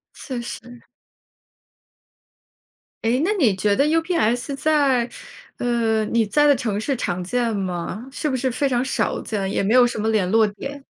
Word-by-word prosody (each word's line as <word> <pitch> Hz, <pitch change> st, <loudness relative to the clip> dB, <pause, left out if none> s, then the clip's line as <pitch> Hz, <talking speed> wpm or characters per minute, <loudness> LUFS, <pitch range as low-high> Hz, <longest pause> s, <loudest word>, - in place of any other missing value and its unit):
确 255 Hz, -4 st, -6 dB
实。 240 Hz, 0 st, -9 dB, 2.2 s
诶， 235 Hz, +3 st, +2 dB
那 340 Hz, +8 st, +1 dB
你 255 Hz, -, +2 dB
觉 200 Hz, +2 st, +1 dB
得 280 Hz, -, +3 dB
UPS 305 Hz, -6 st, 0 dB
在 280 Hz, -5 st, +2 dB, 0.5 s
呃， 230 Hz, -2 st, +1 dB
你 230 Hz, +1 st, +1 dB
在 295 Hz, +8 st, +3 dB
的 285 Hz, -, +6 dB
城 220 Hz, -6 st, -2 dB
市 270 Hz, +4 st, -1 dB
常 180 Hz, -6 st, -3 dB
见 235 Hz, +3 st, -1 dB
吗？ 190 Hz, +4 st, -4 dB
是 305 Hz, -, -3 dB
不 260 Hz, -, -1 dB
是 260 Hz, +1 st, 0 dB
非 265 Hz, +4 st, 0 dB
常 250 Hz, -1 st, +1 dB
少 265 Hz, -, -1 dB
见， 195 Hz, -3 st, -3 dB
也 -, -, 0 dB
没 205 Hz, +4 st, +1 dB
有 250 Hz, -1 st, +7 dB
什 240 Hz, -2 st, -3 dB
么 220 Hz, +1 st, 0 dB
联 205 Hz, -5 st, +1 dB
络 220 Hz, -1 st, +4 dB
点？ 275 Hz, +7 st, -8 dB
240 Hz, 190 characters per minute, -22 LUFS, 215-275 Hz, 2.2 s, 有